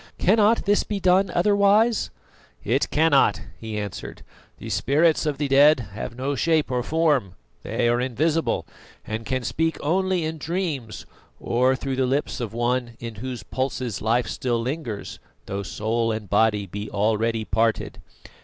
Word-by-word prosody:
"Cannot 215 +3 +3
this 205 0 +3
be 205 -2 -3
done 185 +1 +3
otherwise?" 205 +4 +3 0.5
"It 130 +6 +1
cannot," 145 -10 +3 0.2
he 110 -1 -5
answered. 100 -3 -6 0.3
"The - - -7
spirits 155 +2 +2
of 145 -2 -1
the 145 - -1
dead 140 +2 +6
have 110 +3 -6
no 135 +2 -1
shape 155 +1 +1
or 125 -1 0
form; 145 - +1 0.3
they - - -1
are 120 +1 +2
invisible, 150 +6 0 0.4
and 110 +1 -5
can 130 -1 -1
speak 160 +6 -1
only 185 +2 +1
in 160 0 -4
dreams 150 - -3 0.3
or 125 +2 +2
through 135 0 -4
the 130 -1 +2
lips 140 +3 -1
of 115 -4 -3
one 120 0 -1
in 115 -1 -6
whose 125 -5 -5
pulses 130 -4 -3
life 115 +3 +1
still 120 -2 -1
lingers, 125 -3 -5 0.3
though 100 0 -4
soul 115 +4 -1
and 110 -3 -5
body 105 -1 +3
be 105 +3 -6
already 110 +2 0
parted. 115 0 0
130 Hz, 155 wpm, -24 LUFS, 115-160 Hz, 0.5 s, dead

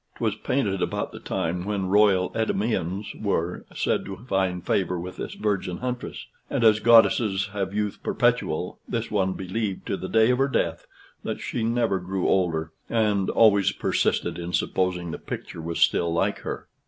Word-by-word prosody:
'Twas - - -1
painted 100 -9 -1
about - - -2
the - - -9
time 90 +2 -2
when 100 -1 -2
royal 95 -1 +4
Endymions 105 -3 -1
were 90 -4 -1
said - - 0
to 95 - -7
find 95 -4 0
favor 90 -2 0
with 90 +2 -7
this - - -5
virgin 100 -4 -1
huntress; 125 -1 -5 0.2
and, - - 0
as 110 -1 +6
goddesses 110 -3 +4
have 95 -2 -2
youth 105 0 -2
perpetual, - - 0
this 115 0 -2
one 95 -3 +1
believed 95 +1 -3
to - - -1
the 95 0 -6
day 110 +2 +4
of 125 - +1
her 135 - +3
death 85 -11 -1 0.3
that - - -4
she 115 - -3
never 115 -4 +1
grew 90 +1 -2
older: 80 -4 +1 0.2
and 105 -4 +1
always 100 -4 +5
persisted 85 - 0
in 85 +1 -5
supposing 90 -1 0
the - - -6
picture - - -7
was 85 +1 -4
still 85 -1 +3
like 85 - 0
her. - - -6
95 Hz, 170 wpm, -25 LUFS, 90-110 Hz, 0.3 s, as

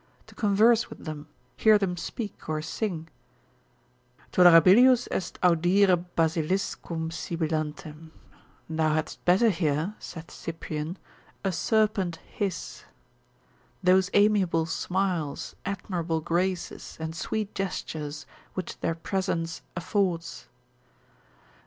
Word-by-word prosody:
to - - -16
converse 220 +2 +3
with - - -11
them, 155 -1 -6 0.3
hear 215 -1 +5
them 195 -3 -1
speak, 205 +3 -6
or 155 0 0
sing, 165 +1 -3 1.2
(tolerabilius 185 +9 +7
est 185 - -3
audire 180 +1 +4
basiliscum 165 0 -1
sibilantem, 155 -1 -4 0.6
thou 160 -1 +1
hadst 155 - -3
better 195 +6 +5
hear, 160 +1 0
saith 165 -1 -9
Cyprian, 160 +1 -5 0.5
a 195 - +1
serpent 210 -2 +1
hiss) 195 -4 -4 1.0
those 185 +1 +4
amiable 200 -6 +3
smiles, 175 -2 -2
admirable 175 -4 -2
graces, 175 +3 -2
and 160 0 -4
sweet 210 +5 -3
gestures, 155 -6 -4 0.3
which 185 -2 -5
their 165 - -1
presence 165 -2 -2
affords. 175 -2 -1
175 Hz, 95 wpm, -27 LUFS, 160-195 Hz, 1.2 s, tolerabilius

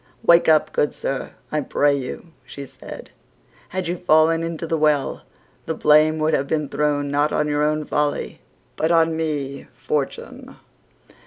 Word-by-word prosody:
"Wake 170 -5 +5
up, 155 -1 +3
good 150 - 0
sir, 135 - -4 0.2
I 150 - 0
pray 145 +1 +2
you," 135 +5 -6
she 140 - -9
said; - - -11 0.6
"had 185 -1 -3
you 175 +1 -2
fallen 165 -1 +3
into 165 0 -4
the 165 - -1
well, 150 -3 +1 0.5
the 160 - -2
blame 155 +1 +4
would 155 0 0
have 140 -1 +1
been 150 -2 -1
thrown 145 -1 0
not 145 +1 +1
on 150 - 0
your 145 0 0
own 155 0 0
folly 150 0 -2 0.3
but 160 - 0
on 165 -1 +3
me, 145 -4 -3
Fortune." 135 +2 -4
150 Hz, 160 wpm, -22 LUFS, 145-160 Hz, 0.6 s, Wake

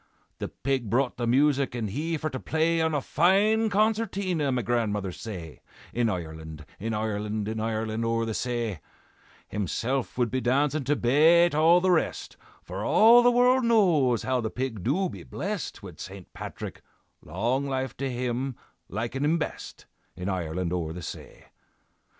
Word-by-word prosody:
"'The - - -3
pig 130 -4 -2
brought 125 +3 +1
the 120 -1 -1
music, 140 +1 +2
and 110 -4 -3
he 160 +7 -2
for 155 - -3
to 130 -4 -4
play 165 +3 +1
On 160 -1 +1
a 145 - 0
fine 205 +9 +3
concertina' 200 -7 +1
(my 125 -2 0
grandmother 105 -4 -1
say), 90 -6 -8 0.3
'In 120 -1 +1
Ireland, 80 -4 -6
in 110 +2 -2
Ireland, 105 -1 -2
In 110 0 -3
Ireland 110 0 -2
o'er 115 0 0
the 110 - -3
say, 115 -8 -2 0.7
Himself 115 - -2
would 120 -3 +1
be 130 +1 0
dancin' 140 +4 +1
to 145 - +2
bate 160 +7 +5
all 165 +4 +5
the 185 0 +3
rest, 170 - 0 0.3
For - - -5
all 230 +3 +7
the 245 - +5
world 250 +1 +4
knows 170 - +3
how 130 -1 0
the 110 - -2
pig 125 -5 -4
do 185 +10 +1
be - - -8
blest 200 - -5
Wid 90 -5 -10
St. 95 -1 -9
Patrick, - - -7 0.4
long 120 - -1
life 130 -2 -2
to 135 -1 -2
him, 125 +1 -2 0.3
likin' 120 +7 -3
him 155 +3 +3
best, 160 - -6 0.3
In 90 +2 -4
Ireland 90 -1 -2
o'er 80 -3 -2
the 90 0 -7
say. - - -9
125 Hz, 165 wpm, -27 LUFS, 110-160 Hz, 0.7 s, all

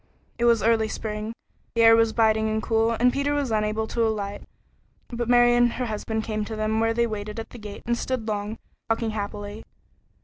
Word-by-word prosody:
It 235 - +2
was 230 -3 +4
early 225 -1 +3
spring, 215 0 -4 0.4
the 230 - +4
air 225 0 +8
was 225 -1 +3
biting 220 -1 +2
and 220 0 -1
cool, 225 0 +2
and 245 +2 +3
Peter 285 +1 0
was 280 -4 -1
unable 215 0 0
to 230 +1 -2
alight, 205 -3 -1 0.7
but 240 -1 -3
Mary 240 0 +6
and 240 0 +3
her 250 - -2
husband 220 0 -3
came 215 -1 -2
to 220 - -5
them 215 +1 0
where 225 0 +1
they 235 0 +3
waited 215 -1 -5
at 225 - -7
the 240 - -10
gate 210 -1 -9
and 235 - +1
stood 245 -2 -3
long, 210 0 -3 0.3
talking 225 0 0
happily. 205 0 -5
220 Hz, 205 wpm, -25 LUFS, 215-235 Hz, 0.7 s, air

